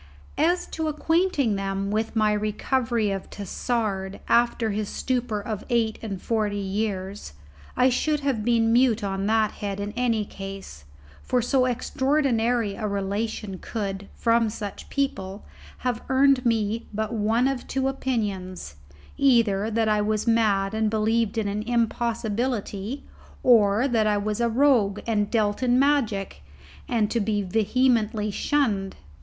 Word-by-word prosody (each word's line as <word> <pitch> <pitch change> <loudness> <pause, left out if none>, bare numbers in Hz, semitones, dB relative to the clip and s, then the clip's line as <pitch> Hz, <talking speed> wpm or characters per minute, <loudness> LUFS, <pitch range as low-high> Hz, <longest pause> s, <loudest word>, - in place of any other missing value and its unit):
As 345 +4 +2
to 320 -1 -3
acquainting 310 - +1
them 195 0 -2
with 220 +2 -1
my 215 -1 +3
recovery 215 +1 0
of 195 -1 -5
Tassard, 200 -1 -3
after 235 -1 +2
his 205 0 -2
stupor 245 -4 -1
of 210 0 -5
eight 230 -3 +1
and 200 -4 -5
forty 210 -1 -1
years, 195 - -3 0.4
I 255 - +5
should 300 +4 0
have 270 -6 -1
been 230 -1 +2
mute 235 -3 +3
on 195 0 -2
that 220 -1 +2
head 200 -1 -5
in 205 +1 -3
any 230 -3 0
case, 195 - -9 0.4
for 250 - 0
so 255 +2 +2
extraordinary 245 -3 +1
a 215 - -3
relation 200 0 -3
could, 200 -3 -4
from 230 -1 +2
such 210 -2 -7
people, 205 -8 -3 0.4
have 245 -2 0
earned 265 -1 +4
me 225 -1 0
but 215 +2 -3
one 225 +3 +2
of 270 -2 -3
two 265 0 -1
opinions: 200 - -3 0.4
either 225 -6 +3
that 225 0 +1
I 210 -1 +2
was 215 0 0
mad 210 -4 +2
and 220 0 +1
believed 220 +1 +1
in 220 -2 0
an 205 +1 -2
impossibility, 235 0 -1 0.4
or 220 0 +5
that 225 -4 +2
I 210 -1 +2
was 210 +2 -2
a 235 - +2
rogue 230 -5 +3
and 210 -3 0
dealt 210 -2 0
in 250 -1 +3
magic, 260 -8 +1 0.5
and 225 -4 +1
to 235 - +1
be 205 -1 0
vehemently 220 +1 +1
shunned. 205 -7 0
220 Hz, 145 wpm, -25 LUFS, 205-245 Hz, 0.5 s, I